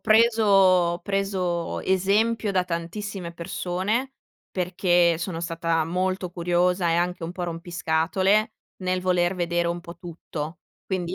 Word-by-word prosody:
preso 225 0 +4
ho 185 -3 +4
preso 185 -3 -1
esempio 205 +4 +1
da 185 -1 +2
tantissime 175 +1 -5
persone, 190 +10 -2 0.4
perché 175 -2 +2
sono 170 -1 -4
stata 165 -1 0
molto 185 +1 -1
curiosa, 175 0 +1
e - - +2
anche 175 0 -1
un 165 - -4
po' 180 -1 -4
rompiscatole, 175 +5 0 0.3
nel 185 0 0
voler 180 0 +1
vedere 170 0 0
un 175 0 -2
po' 170 -1 -10
tutto, 165 -2 -7 0.3
quindi, 185 -1 -2
180 Hz, 130 wpm, -25 LUFS, 170-190 Hz, 0.4 s, preso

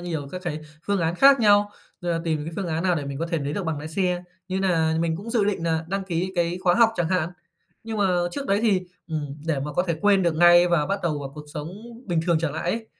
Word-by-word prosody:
nhiều 160 -5 -4
các 185 0 -6
cái 155 -3 -3 0.3
phương 200 -2 +1
án 165 0 0
khác 275 +7 +6
nhau, 205 -1 +5 0.3
rồi 175 -1 -1
nà 165 - -1
tìm 155 -3 -1
những 165 +1 -6
phương 195 - -2
án 165 0 -2
nào 180 -2 +2
để 150 -4 -3
mình 140 0 -5
có 165 - -2
thể 170 -1 -1
nấy 145 0 -3
được 195 - -3
bằng 160 -2 -2
lái 150 +2 -6
xe, 180 +1 0 0.3
như 190 +1 -1
nà 165 -4 +2
mình 165 -1 0
cũng 205 +6 -7
dự 230 -3 +2
định 200 -4 -1
nà 165 -1 0
đăng 195 +1 -2
ký 185 0 -2
cái 175 0 0
khóa 175 -1 +4
học 230 -1 +5
chẳng 170 -2 0
hạn. 175 -3 0 0.5
Nhưng 225 -1 -4
mà 200 - +3 0.3
trước 280 -1 -4
đấy 200 - +2
thì, 205 -5 +3 0.3
ừm, 145 -3 -4
để 155 -4 0
mà 150 +2 -4
có 180 - +1
thể 170 - 0
quên 200 0 +4
được 170 -2 +1
ngay 175 +1 +7
và 170 -4 +2
bắt 195 +1 -1
đầu 155 -4 0
vào 135 -1 -7
cuộc 150 -1 -9
sống 150 0 -4 0.4
bình 170 -3 +1
thường 170 -2 +3
trở 165 -2 0
lại 160 +4 -2
ấy, 225 +1 -3
175 Hz, 280 wpm, -24 LUFS, 160-195 Hz, 0.5 s, ngay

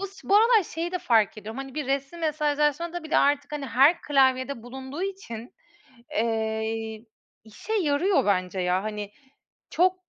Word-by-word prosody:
bu 395 - -2
s 395 0 -15
bu 400 - +6
aralar 450 -1 +5
şeyi 335 +2 -5
de 365 - -1
fark 220 -5 +2
ediyorum: 220 +5 -8
Hani, 270 -1 -7
bir 300 -3 -3
resmi 275 +5 -2
mesajlaşmada 305 +2 0
bile 315 - 0
artık, 285 +1 +2
hani, 290 -2 -4
her 275 +8 +4
klavyede 260 -3 +2
bulunduğu 265 +6 -7
için, 370 - -6 0.6
eee, 220 0 -2 0.4
işe 220 - -7
yarıyor 325 - +2
bence 185 -2 0
ya. 180 +2 +1
Hani, 210 -1 -5 0.6
çok, 365 +2 +3
275 Hz, 155 wpm, -26 LUFS, 225-335 Hz, 0.6 s, bu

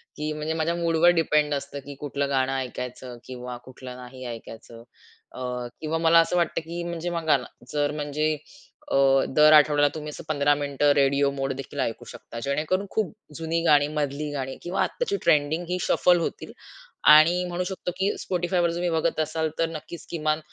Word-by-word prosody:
की 150 +1 -3
म्हणजे 150 +1 -3
माझ्या 165 +1 0
मूडवर 170 0 +3
डिपेंड 150 -2 +2
असतं, 140 0 -4
की 140 - -8
कुठलं 140 -1 -2
गाणं 135 -1 +1
ऐकायचं 125 -1 -6
किंवा 125 -1 -7
कुठलं 130 -1 -10
नाही 125 +1 -10
ऐकायचं. 115 0 -9 0.5
अ, - - -8 0.4
किंवा 160 +1 -1
मला 165 0 +5
असं 165 +2 +2
वाटतं, 170 -2 0
की 170 +2 -6
म्हणजे 170 0 -4
बघा 165 -4 +2
ना 125 - -8 0.3
जर 145 -1 +1
म्हणजे 150 +1 0 0.6
अ, - - +3 0.4
दर 155 0 +7
आठवड्याला 150 -1 +6
तुम्ही 150 -1 -6
असं 150 - -8
15 145 -1 +3
मिनिटं 145 0 +1
रेडिओ 140 0 +3
मोड 135 -1 -2
देखील 135 +1 -7
ऐकू 115 -4 -2
शकता, 115 - -9
जेणेकरून 155 +8 0
खूप 215 -2 -1 0.2
जुनी 165 +1 -1
गाणी, 145 -2 +5
मधली 150 0 -2
गाणी 135 -2 -4
किंवा 175 +2 -2
आत्ताची 430 -5 -2
ट्रेंडिंग 155 +3 +2
ही 180 - 0
शफल 175 +3 +3
होतील. 165 - -4 0.6
आणि 170 +4 +6
म्हणू 175 0 -2
शकतो, 180 -1 -4
की 190 +1 +1
Spotifyवर 175 -1 0
तुम्ही 175 +1 -1
बघत 165 0 0
असाल, 155 +1 -1
तर 165 - +2
नक्कीच 165 +1 -8
किमान 155 -2 0
150 Hz, 175 wpm, -25 LUFS, 140-165 Hz, 0.6 s, दर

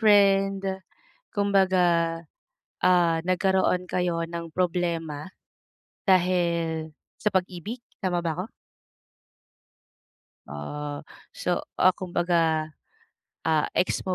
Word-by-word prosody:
friend, 195 -2 +4 0.7
kumbaga, 185 -5 +3 0.7
ah, 175 -2 +4
nagkaroon 185 0 +2
kayo 175 -2 0
ng 170 0 -6
problema, 170 -3 -1 0.8
dahil 170 -4 +2 0.3
sa 210 - +1
pag-ibig, 185 +5 -2 0.2
tama 180 -2 +1
ba 160 -2 0
ako? 210 - -10 2.0
Ah. 145 - -6 0.3
So, 180 -1 0 0.2
ah, 185 - +5
kumbaga, 170 -3 0 0.8
ah, 155 -2 +3
ex 185 - +1
mo 185 - 0
175 Hz, 85 wpm, -26 LUFS, 165-185 Hz, 2.0 s, ah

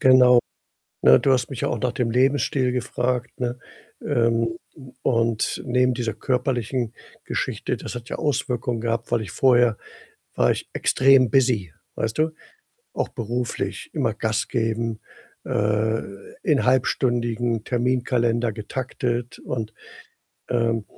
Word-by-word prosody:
Genau, 130 -2 +7 0.6
ne, 65 +1 +8
du 135 - +2
hast 125 -2 +1
mich 130 -4 -6
ja - - +1
auch 120 - -1
nach 125 -1 0
dem 120 -2 -1
Lebensstil 130 +1 +2
gefragt, 125 -1 -1
ne? 125 0 -2 0.5
Ähm, 115 +1 +1 0.5
und 115 -2 +1
neben 125 0 +2
dieser 115 -2 -2
körperlichen 125 -2 -1 0.3
Geschichte - - -2
das - - -7
hat 120 0 -7
ja - - -3
Auswirkungen 125 -4 -1
gehabt, 115 0 -2
weil - - +3
ich 105 -5 -6
vorher 120 -2 +4 0.6
war - - +4
ich - - -4
extrem 130 -2 +4
busy, 115 - +2 0.2
weißt 110 -1 -2
du? 160 +1 +2 0.6
Auch - - -1
beruflich, 120 +1 -3
immer - - 0
Gas - - -1
geben, 115 0 -1 0.5
äh, 105 +2 +1 0.4
in 145 -5 +2
halbstündigen 120 -3 +1
Terminkalender 120 -1 +1
getaktet 120 +2 -4
und, 115 -3 -4 0.8
ähm 115 -2 +1
120 Hz, 125 wpm, -23 LUFS, 115-125 Hz, 0.8 s, ne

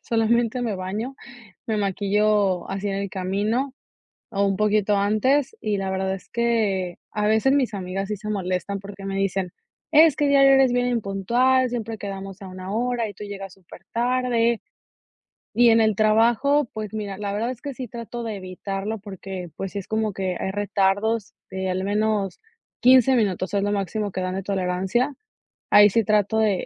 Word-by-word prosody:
solamente 235 +1 +1
me 225 -4 -1
baño, 210 +8 -4 0.5
me 220 -2 0
maquillo 200 -1 +1
así 195 +1 -3
en 195 - -2
el 200 0 -2
camino 205 +8 -1 0.6
o 200 -1 +1
un 195 -1 +1
poquito 210 0 +2
antes. 250 - +2
Y 210 -1 0
la 195 -1 -2
verdad 190 0 -1
es 190 - -9
que 215 -7 0
a 210 0 -1
veces 220 +6 +3
mis 260 -5 +1
amigas 195 0 -4
sí 210 - -1
se 215 +1 -7
molestan 190 -1 -2
porque 195 0 -10
me 195 0 -3
dicen: 195 -2 -1 0.4
"Es 315 -1 +6
que 290 - +1
diario 275 -1 +6
eres 270 -2 +5
bien 245 0 +2
impuntual. 240 +4 +2
Siempre 230 -2 -4
quedamos 195 -1 -7
a - - -7
una 185 +1 -7
hora 235 0 -1
y 205 - -11
tú - - -8
llegas 195 -2 -7
supertarde". 235 +5 -1 0.9
Y 240 0 +6
en 225 0 +5
el 220 -1 +3
trabajo. 230 +7 +3
Pues 215 -1 -5
mira, 205 -3 -4
la 205 -1 -3
verdad 225 +4 -1
es 245 -2 -9
que 280 - -5
sí 255 -1 -6
trato 235 +1 -7
de 225 -2 -4
evitarlo, 195 +3 -4
porque, 190 -2 -7
pues, 195 -1 -5
sí - - -4
es 195 - -9
como 220 -1 0
que 185 -1 -2
hay - - -2
retardos 205 +1 0 0.2
de 190 0 -3
al 185 +1 -1
menos 205 -1 0 0.4
15 255 +1 +6
minutos, 195 -5 0
es 200 - +2
lo 205 - 0
máximo 205 +1 -2
que 185 - -3
dan 185 0 -2
de 195 - -2
tolerancia. 190 +7 0 0.6
Ahí 205 0 +8
sí 230 +1 +3
trato 210 +1 +2
de 210 -4 +1
210 Hz, 180 wpm, -23 LUFS, 195-235 Hz, 0.9 s, Ahí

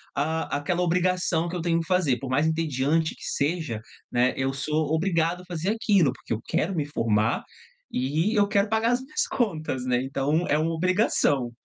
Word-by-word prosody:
ah, 155 +1 -1
aquela 175 +5 -1
obrigação 180 -1 +1
que 175 - -5
eu 175 - -2
tenho 165 0 +1
que 165 - -5
fazer, 165 -9 +2
por 135 - -6
mais 145 +4 +2
entediante 160 0 0
que - - -14
seja, 150 -6 -1 0.3
né, 125 +1 +2
eu 135 0 0
sou 150 +2 -1
obrigado 165 0 +1
a - - -15
fazer 175 +1 -3
aquilo, 200 - +3
porque 115 - -5
eu 110 - -3
quero 180 +3 -1
me 150 -3 0
formar, 115 -6 0 0.5
e 155 - 0
eu 205 -1 +4
quero 200 0 +2
pagar 225 +2 +2
as 245 +1 +1
minhas 285 +4 -1
contas, 155 - -2
né, 125 0 +1
então 140 +5 0
é 145 - +2
uma 165 +2 0
obrigação. 160 - +1
160 Hz, 190 wpm, -26 LUFS, 140-180 Hz, 0.5 s, eu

